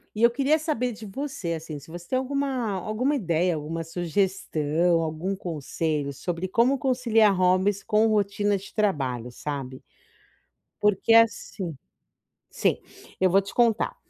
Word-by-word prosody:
e 215 - -1
eu 235 - +7
queria 280 +5 +2
saber 275 -6 -1
de 220 0 -9
você, 205 -5 -4
assim, 160 -2 -6
se 145 +3 -13
você 175 +1 -9
tem 255 - 0
alguma 265 -3 -1
alguma 215 +9 -1
ideia, 175 - +1
alguma 160 +2 -4
sugestão, 170 -1 0
algum 160 +5 -3
conselho 155 -4 -3
sobre 170 +6 -4
como 240 +7 +2
conciliar 240 -6 +3
hobbies 185 +2 +2
com 215 +1 +3
rotina 205 -1 +1
de 195 - -12
trabalho, 135 - -1
sabe, 130 -1 -6 0.9
porque, 210 +2 +2
assim, 225 -6 +2 0.8
sim, - - 0 0.4
eu 185 - +5
vou 190 +2 +5
te 195 - -6
contar. 235 -2 +2
195 Hz, 140 wpm, -25 LUFS, 165-230 Hz, 0.9 s, eu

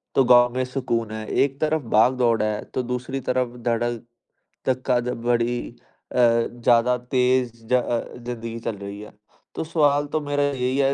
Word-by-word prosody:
तो 135 - +5
गाँव 120 -1 +6
में 130 - +1
सुकून 125 -4 -2
है, 110 0 -5
एक 135 0 +1
तरफ़ 155 0 +1
भागदौड़ 120 0 +3
है 105 0 -1
तो 130 - -1
दूसरी 125 +2 -3
तरफ़ 125 -1 -1
धड़क 120 0 0 0.6
धक्का 130 -1 +1
द 120 - -3 0.2
बड़ी 120 0 +1 0.5
अ, - - -4
ज़्यादा 120 +1 +3
तेज़ 125 0 +1 0.2
ज - - -1
अ, 120 -2 +1
ज़िंदगी 115 -1 -6
चल 115 -2 -4
रही 100 +1 -7
है। 105 - -11 0.4
तो - - -2
सवाल 145 -3 +2
तो 155 - +1
मेरा 145 0 0
यही 130 -2 0
है 135 0 +3
125 Hz, 170 wpm, -23 LUFS, 115-130 Hz, 0.6 s, गाँव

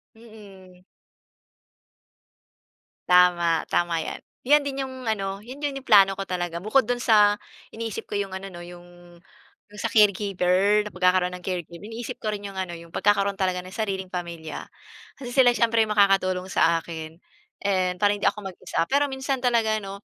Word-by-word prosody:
Mm. 195 -5 -16 2.2
Tama, 175 -2 +4
tama 175 -1 0
yan. - - -5 0.3
Yan 295 +2 +5
din 275 -1 -2
yung 260 -2 -8
ano, 195 -3 -2
'yon 260 +6 -10
yung 285 -1 -1
yung 270 - -15
plano 195 -3 +6
ko - - -2
talaga 175 -2 -3
bukod 265 +6 +3
do'n 245 0 -1
sa 210 -3 +5 0.4
iniisip 225 -2 -5
ko - - -4
yung 195 -2 -3
ano 195 +1 -6
'no, 175 - -10
yung, 175 0 -14 0.6
yung 210 - -13
sa - - -1
caregiver 200 -1 +3
na - - -6
pagkakaroon 180 0 +2
ng 180 - -20
caregiver. 175 -2 -5
Iniisip 230 +1 -7
ko 215 - -1
rin 205 - -7
yung 195 -1 -8
ano 185 -2 -3
yung 170 0 -12
pagkakaroon 200 -1 +1
talaga 185 -2 0
ng 185 - -11
sariling 195 -4 -3
pamilya 170 -3 -6 0.5
kasi 250 -3 -7
sila 260 -3 +6
siyempre 230 -1 +3
makakatulong 195 -3 +2
sa 165 -2 +2
akin 160 -1 -8 0.5
and 185 -2 0
para 205 0 +4
hindi - - -1
ako 210 - 0
mag-isa. 175 - -3
Pero 285 +1 +3
minsan 265 0 -2
talaga 230 -3 +2
'no, 195 +1 -8
195 Hz, 165 wpm, -24 LUFS, 180-220 Hz, 2.2 s, plano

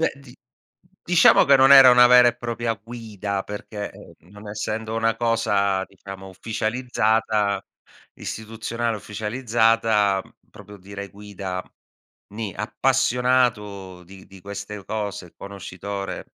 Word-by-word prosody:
Beh 165 - +1
di 135 -3 -15 0.7
diciamo 175 -1 +6
che 140 -1 +6
non 135 +1 +6
era 135 -2 +10
una 125 0 +7
vera 125 0 +7
e 120 - -3
propria 120 -1 -3
guida, 105 -3 -6
perché, 105 0 -7
ehm, - - -15 0.2
non 105 +1 -12
essendo 110 +1 -4
una 115 0 +1
cosa 105 -5 +1
diciamo, 95 0 -11
ufficializzata, 110 -1 -1 0.5
istituzionale 115 +1 -4
ufficializzata, 110 -2 +1
uhm, - - -22 0.2
proprio 105 0 -13
dire 100 +1 -9
guida, 100 -2 -7 0.7
ni. 105 -4 -5
Appassionato 105 -5 0
di 95 +1 -15
di 95 -1 -15
queste 100 0 -7
cose, 100 -4 -5
conoscitore 100 0 -7
105 Hz, 120 wpm, -23 LUFS, 100-115 Hz, 0.7 s, era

